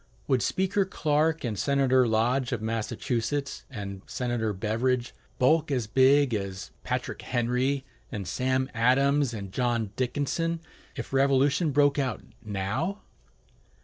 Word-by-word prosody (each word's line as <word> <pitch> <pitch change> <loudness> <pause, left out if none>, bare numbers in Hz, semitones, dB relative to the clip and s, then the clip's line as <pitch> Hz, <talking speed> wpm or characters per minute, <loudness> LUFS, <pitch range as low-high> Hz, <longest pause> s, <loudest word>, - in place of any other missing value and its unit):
Would 130 -3 +2
Speaker 190 +2 +1
Clark 160 -3 0
and 110 -5 -2
Senator 130 -3 +3
Lodge 120 +4 +1
of 125 - -1
Massachusetts, 115 +4 -2
and 100 -6 -6
Senator 120 -3 -1
Beveridge 115 +5 -1 0.2
bulk 155 +5 +3
as 130 -5 0
big 130 +3 +4
as 100 -2 -4
Patrick - - -3
Henry 125 +3 0 0.3
and 100 -4 -5
Sam 130 +3 0
Adams 135 +3 +3
and 100 -4 -6
John 115 -3 0
Dickinson, 145 +6 -1 0.4
if - - -6
revolution 140 +4 +3
broke 145 0 +3
out 130 -5 -2 0.2
now? 110 - -2
130 Hz, 120 wpm, -27 LUFS, 115-140 Hz, 0.4 s, big